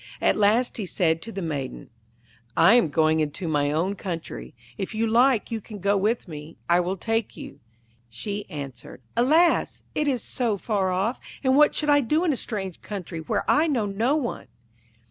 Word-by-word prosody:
At - - +3
last 215 +4 +2
he 205 -5 -3
said 165 -3 +1
to 225 - -7
the 195 -3 -5
Maiden, 140 -7 -5 0.7
'I 210 - +7
am 235 -10 +4
going 155 +1 +2
into 155 +3 -2
my 145 -2 +1
own 170 +6 0
country. 175 -10 -6 0.2
If 195 +2 -5
you 225 +1 +1
like 235 +1 +3
you 225 -1 -2
can 210 0 -9
go 200 +1 +1
with 210 +4 0
me; 155 -1 -9
I 175 +1 +4
will 180 +2 -1
take 225 +2 -2
you.' 140 - -9 0.5
She 200 - -5
answered: 135 -4 -8
'Alas! 310 +9 +3
it 300 - 0
is 255 -5 0
so 230 -5 -1
far 200 -2 0
off, 195 +7 0 0.2
and 260 0 +3
what 295 +1 +5
should 300 -1 +2
I 290 - +6
do 305 +7 +1
in 330 -5 +2
a - - -1
strange 195 -7 -5
country 185 -5 -6
where 160 - -1
I 315 +2 +4
know 250 -9 +1
no 220 +8 +1
one?' 260 - -3
205 Hz, 190 wpm, -25 LUFS, 165-240 Hz, 0.7 s, I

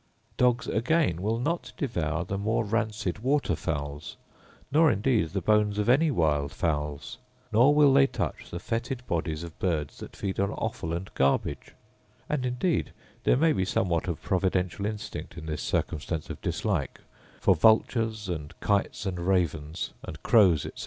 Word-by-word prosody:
Dogs 125 -1 +2
again 120 - +1
will 110 +3 0
not 165 +8 -2
devour 85 - -1
the 95 +2 -3
more 110 +2 0
rancid 105 -3 -1
water 135 - +1
fowls, 75 -1 -4 0.5
nor 155 +3 +5
indeed 105 -4 +1
the 95 +2 -3
bones 105 +1 +3
of 105 - 0
any 140 +7 +4
wild 75 - +1
fowls; 75 - -3 0.3
nor 125 +7 +5
will 145 -2 +6
they 135 0 +6
touch - - -4
the 85 - -5
foetid 120 +6 -3
bodies 80 -3 -2
of 85 -2 -10
birds 80 -6 -1
that - - -9
feed 95 -1 -3
on 100 +1 +1
offal 110 -8 -3
and 85 +3 -4
garbage: 70 0 0 0.5
and 135 -4 -1
indeed 125 +8 0 0.3
there - - +4
may 160 +2 +4
be 95 - 0
somewhat 90 -3 0
of 85 -3 -2
providential 95 +1 0
instinct 105 -1 -6
in - - -7
this 75 -2 -3
circumstance 80 +2 -2
of 75 - -8
dislike; - - -2 0.4
for - - +4
vultures,* 110 -1 +2
and 80 -2 -5
kites, 100 0 0
and 90 -2 -2
ravens, 85 -4 0
and 75 - -8
crows, 95 - +5
etc. - - -8
100 Hz, 160 wpm, -27 LUFS, 80-115 Hz, 0.5 s, will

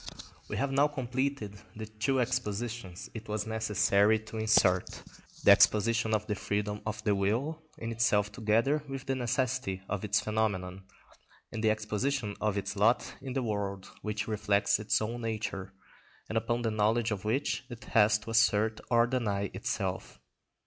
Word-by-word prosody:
We - - -4
have 140 0 0
now 140 +2 +4
completed 130 -6 -3 0.2
the 110 0 -5
two 110 +5 -1
expositions 115 -5 -3
it 110 -2 -8
was 105 -1 -2
necessary 105 -1 +3
to 110 0 -9
insert; 100 -4 +2 0.4
the - - +8
exposition 110 +1 +4
of 105 0 -2
the 105 - -1
freedom 105 +1 -2
of 110 0 -4
the 105 - +2
will 115 +11 0 0.2
in 115 0 -4
itself 105 -3 +2
together 115 +7 +1
with 135 0 -5
the 135 - 0
necessity 125 -6 -1
of 105 0 -3
its 105 0 +2
phenomenon, 95 -4 -2 0.7
and 110 - -4
the 110 - +4
exposition 110 +2 -1
of 105 -1 0
its 100 - -3
lot 110 +4 +2
in 130 -2 -5
the 135 -1 -1
world 100 -3 -3
which 105 -1 -3
reflects 100 -2 +2
its 105 0 +1
own 120 +2 -4
nature, 105 -4 -3 0.6
and - - -5
upon 120 +2 0
the 115 - 0
knowledge 110 +2 +1
of 100 -3 -3
which 130 +4 -1
it 120 -2 -9
has 110 -1 +4
to 110 +1 -8
assert 110 -1 +3
or 120 -1 +5
deny 105 -6 -1
itself. - - -3
110 Hz, 165 wpm, -30 LUFS, 105-120 Hz, 0.7 s, the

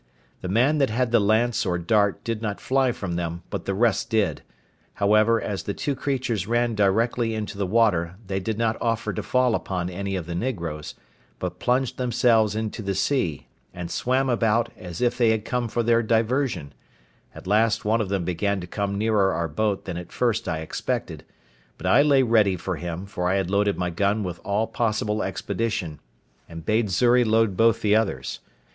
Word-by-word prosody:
The - - -4
man 130 +10 +3
that 135 - +3
had 120 +2 0
the 120 - +5
lance 110 +3 +2
or 90 -3 0
dart 100 +3 +1
did 115 -2 -3
not 105 -3 -3
fly 130 -1 +1
from 95 -7 -4
them, 85 0 -4
but - - -4
the 100 - -1
rest 115 +1 +1
did; 110 -4 +1 0.5
however, 110 +3 +3
as 100 -3 -3
the 100 - -4
two 145 - -1
creatures 130 -7 -2
ran 120 0 +1
directly 110 +3 +1
into 110 -2 -4
the 100 -1 -2
water, 90 -5 +2
they 95 0 -2
did 105 +3 -3
not 115 -1 0
offer 115 -2 -1
to - - -3
fall 125 -2 +2
upon 90 -4 -2
any 100 +2 -3
of 90 -3 -3
the 85 - -5
negroes, 85 -8 -4 0.4
but - - -5
plunged 125 +1 0
themselves 115 -3 +2
into 110 +1 -3
the 100 -2 -2
sea, 100 - 0 0.3
and 90 -1 -6
swam 130 +2 +1
about, 115 -2 +2
as 90 -2 -8
if 125 0 +1
they 120 -2 +4
had 110 -1 0
come 125 -1 -1
for 120 +1 -1
their 115 0 +3
diversion; 115 - 0 0.6
at - - -11
last 110 +3 +2
one 110 +2 +2
of 100 - -3
them 95 -3 -1
began 95 +3 -1
to 90 - -6
come 100 +2 -3
nearer 105 -2 +2
our 85 - -1
boat 100 +6 -1
than 90 -3 -4
at 90 - -8
first 120 -3 0
I 80 0 -2
expected; 80 - -4 0.5
but - - -9
I 140 - +5
lay 140 -2 +4
ready 110 -5 +3
for 90 0 -4
him, 85 +4 -5
for 90 -2 -2
I 95 - +2
had 95 -2 -1
loaded 100 0 +2
my 90 -1 -1
gun 100 +4 0
with 90 -2 -5
all 105 +2 0
possible 110 -2 -1
expedition, 95 -4 -3 0.5
and 80 -1 -9
bade 110 +1 +1
Xury 120 +6 +4
load 110 -3 +2
both 115 +2 +3
the 105 0 +4
others. 110 -2 -1
105 Hz, 195 wpm, -24 LUFS, 95-115 Hz, 0.6 s, the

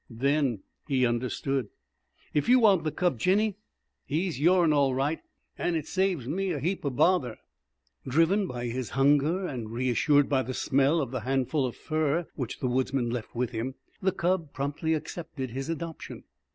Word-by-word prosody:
Then 130 -2 0 0.2
he 130 -4 +2
understood. 125 +1 -1 0.7
"If 150 +10 +1
you 255 - +7
want 200 -9 +4
the 155 - 0
cub, 175 -9 0
Jinny, 200 - +2 0.5
he's 165 0 -1
your'n 170 0 +4
all 140 -3 +3
right. 145 +4 0 0.4
An' 175 - 0
it 155 -3 -2
saves 185 -9 0
me 190 +7 -1
a 160 -5 -1
heap 180 +7 -2
o' 140 - 0
bother." 130 -2 +2
II - - -18 0.7
Driven 165 +8 +3
by 125 -4 -5
his 120 0 -3
hunger, 145 +7 +3
and 120 -9 -5
reassured 130 +5 +2
by 135 -3 +2
the 130 0 -4
smell 140 +3 +2
of 130 -4 -4
the 130 - -2
handful 135 +3 0
of 120 - -7
fur 155 +1 0
which 130 -6 -5
the 130 - 0
woodsman 125 -1 0
left 120 -1 -5
with 125 +1 -1
him, 125 +3 -3 0.3
the 190 - +2
cub 175 -4 -1
promptly 145 +4 -1
accepted 155 -5 -6
his 135 +4 -4
adoption. 165 0 -6
145 Hz, 175 wpm, -28 LUFS, 130-170 Hz, 0.7 s, you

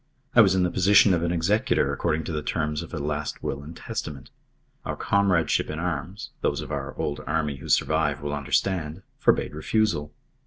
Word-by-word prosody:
I 120 - +8
was 95 -4 +5
in 95 - +3
the 90 - +1
position 100 +2 +5
of 85 - +1
an 85 0 0
executor 85 -4 +1
according 80 +2 -1
to - - -5
the 75 -2 -2
terms 75 0 -2
of 85 - -9
a - - -4
last 75 0 -3
will 70 - -3
and 80 +3 -10
testament. 70 -4 -6 0.5
Our - - -3
comradeship 95 -6 +1
in 75 - -4
arms 90 +3 -4
those - - 0
of - - -8
our - - -4
old 70 - -2
Army 75 -2 -1
who 70 - -10
survive 80 -2 +2
will 75 0 -4
understand 80 +4 -1 0.2
forbade - - +2
refusal. 80 -2 0
80 Hz, 190 wpm, -25 LUFS, 75-90 Hz, 0.5 s, I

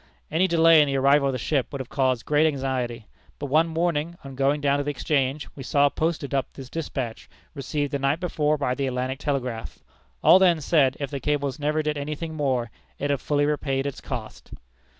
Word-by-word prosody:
Any 180 +4 +3
delay 165 -2 +6
in 145 - +3
the 135 - -1
arrival 140 +1 +4
of - - +1
the - - -1
ship 135 +2 0
would 140 - -5
have 130 - -5
caused 130 -3 0
great 150 +1 +3
anxiety. 130 -5 -2 0.3
But 145 -2 -6
one 160 +3 +4
morning, 165 0 -1
on 135 -1 -9
going 140 +2 +1
down 140 -1 +1
to - - 0
the 145 - -3
Exchange, 140 -1 -1
we 140 - -8
saw 140 +2 +3
posted 155 -2 -2
up 135 -1 -1
this 130 -2 -10
despatch 130 -8 -5 0.2
received 145 0 -3
the 140 - -1
night 140 +3 +1
before 155 -4 0
by 130 -3 0
the 135 +1 -2
Atlantic 130 +1 -2
Telegraph. 130 -6 -3 0.5
All 185 - +8
then 175 -4 +4
said, 140 -3 +2
if 140 -1 -4
the 140 - -3
cable 145 -1 -1
never 150 +1 0
did 150 -1 -1
any 150 +2 -3
thing 160 +1 -6
more, 130 -6 -1 0.3
it 145 0 -1
had 140 - -1
fully 145 -1 +1
repaid 140 -2 -1
its 140 - -4
cost." - - -7
145 Hz, 210 wpm, -25 LUFS, 135-150 Hz, 0.5 s, All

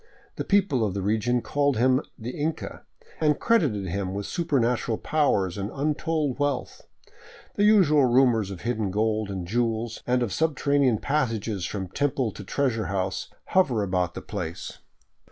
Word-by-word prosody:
The - - -3
people 190 - +2
of 100 -3 -1
the 100 - -1
region 110 +4 +1
called 145 -3 +1
him 130 +3 +3
" - - -44
the - - -2
Inca 155 +4 -4 0.2
" - - -24
and 150 -1 +3
credited 140 - +2
him 95 +1 -3
with 100 0 -3
supernatural 125 -8 0
powers 100 - +1
and 100 +1 -3
untold 150 0 -1
wealth. 145 -2 -2 0.7
The 205 - +2
usual 165 -10 +5
rumors 120 -5 +3
of 95 -3 -7
hidden 110 -4 -1
gold 110 +1 0
and 95 -3 -4
jewels, 115 +2 -1
and 125 0 +2
of 110 - -2
subterranean 140 -5 +2
passages 110 -9 -1
from 95 -3 -4
temple 135 +1 -1
to 100 - -9
treasure 115 0 -1
house, 95 -1 -2 0.2
hover 135 - +3
about 90 -2 -1
the - - -6
place. - - -6
120 Hz, 160 wpm, -26 LUFS, 100-145 Hz, 0.7 s, usual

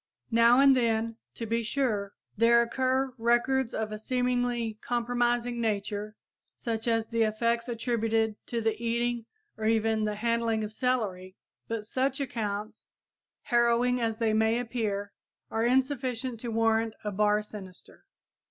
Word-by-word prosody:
Now 235 +2 +6
and 275 -1 +7
then, 230 -2 0 0.2
to 230 - -4
be 230 +1 0
sure, 220 -5 -1 0.2
there 235 +2 +5
occur 260 +2 0
records 240 +2 +2
of 220 -1 -3
a 215 - -5
seemingly 245 -2 -1
compromising 240 0 0
nature, 210 -1 -2 0.4
such 225 -1 -3
as 225 -1 +2
the 230 0 0
effects 230 +2 +1
attributed 225 -2 0
to 235 -1 -2
the 225 0 +1
eating 235 0 -1 0.3
or 220 - -4
even 220 -1 +2
the 210 0 -1
handling 230 0 0
of 210 0 -5
celery; 205 -7 -1 0.3
but 225 -2 -3
such 265 +4 -1
accounts, 215 -4 -4 0.6
harrowing 240 +1 +2
as 225 -1 0
they 225 -1 +1
may 220 +1 +3
appear, 215 -5 -2 0.4
are 225 - 0
insufficient 255 -2 0
to 240 - -5
warrant 225 0 +1
a 210 - -2
bar 210 +1 +2
sinister. 190 -4 -11
230 Hz, 140 wpm, -28 LUFS, 220-240 Hz, 0.6 s, and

